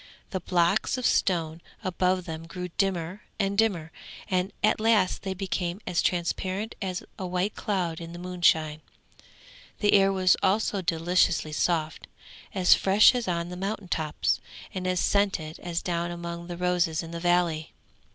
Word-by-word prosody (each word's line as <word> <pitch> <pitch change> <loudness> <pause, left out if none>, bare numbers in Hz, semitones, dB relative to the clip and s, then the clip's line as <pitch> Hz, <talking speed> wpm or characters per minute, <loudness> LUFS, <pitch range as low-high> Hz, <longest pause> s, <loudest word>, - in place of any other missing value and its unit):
The 190 - -1
blocks 180 +6 +1
of 250 - -3
stone 165 -3 +1 0.2
above 185 0 0
them 165 -1 -6
grew 180 +1 -6
dimmer 185 +1 -1 0.2
and 200 -1 0
dimmer, 190 -7 +1 0.4
and 185 +1 0
at 215 - +3
last 215 -4 +2
they 190 -1 -4
became 185 -1 -2
as 180 -2 +1
transparent 185 +4 -1
as 185 -2 -3 0.2
a 185 - -3
white 180 +3 -1
cloud 175 -5 -2
in 165 0 -7
the 170 - -8
moonshine. 165 -4 +1 1.0
The 205 - +2
air 195 -1 +5
was 185 -1 +4
also 200 0 +1
deliciously 165 -2 +1
soft, 160 0 -1 0.4
as 185 -4 +5
fresh 195 +5 +6
as 245 -4 -2
on 170 -1 -1
the 180 - -6
mountain 195 +1 -4
tops 155 -3 0 0.3
and 185 -1 -3
as 185 -1 +1
scented 190 -7 0
as 170 -1 -3
down 170 -1 -1
among 170 0 -6
the 175 -1 -6
roses 175 -2 +1
in 165 - -8
the 170 - -5
valley. 175 -2 +1
180 Hz, 160 wpm, -27 LUFS, 170-195 Hz, 1.0 s, fresh